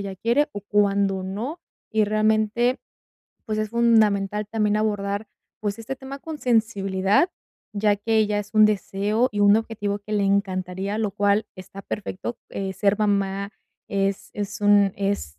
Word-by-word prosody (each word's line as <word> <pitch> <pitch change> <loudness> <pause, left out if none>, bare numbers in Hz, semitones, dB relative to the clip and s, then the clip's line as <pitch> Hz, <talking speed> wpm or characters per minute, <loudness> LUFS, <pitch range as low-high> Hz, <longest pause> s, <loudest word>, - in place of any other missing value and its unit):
ella 195 -1 -5
quiere, 245 +9 +2
o 205 - -5
cuándo 200 -2 +1
no. 230 - -5 0.3
Y, 220 - +3
realmente, 215 +3 +1 0.7
pues, 215 -1 -2
es 215 -1 -2
fundamental 210 -3 +2
también 210 -2 +1
abordar, 205 -1 -1 0.3
pues, 205 +1 -2
este 255 +4 -5
tema 270 +1 -8
con 315 +1 -7
sensibilidad, 215 - +2 0.4
ya 205 0 +2
que 220 +1 +2
ya 205 0 0
es 205 0 -10
un 215 0 +7
deseo 210 +3 0
y 205 - -2
un 205 +1 +6
objetivo 205 -2 -2
que 210 +1 -8
le 205 -1 +2
encantaría, 195 0 -1
lo 215 -2 0
cual 205 +1 +2
está 195 +1 -10
perfecto, 205 +3 -5
eh, 195 -1 -3
ser 200 +2 +1
mamá 200 -1 0 0.4
es 195 0 -1
es 205 0 -4
un 205 -1 +5
es 195 - -2
205 Hz, 155 wpm, -24 LUFS, 200-220 Hz, 0.7 s, un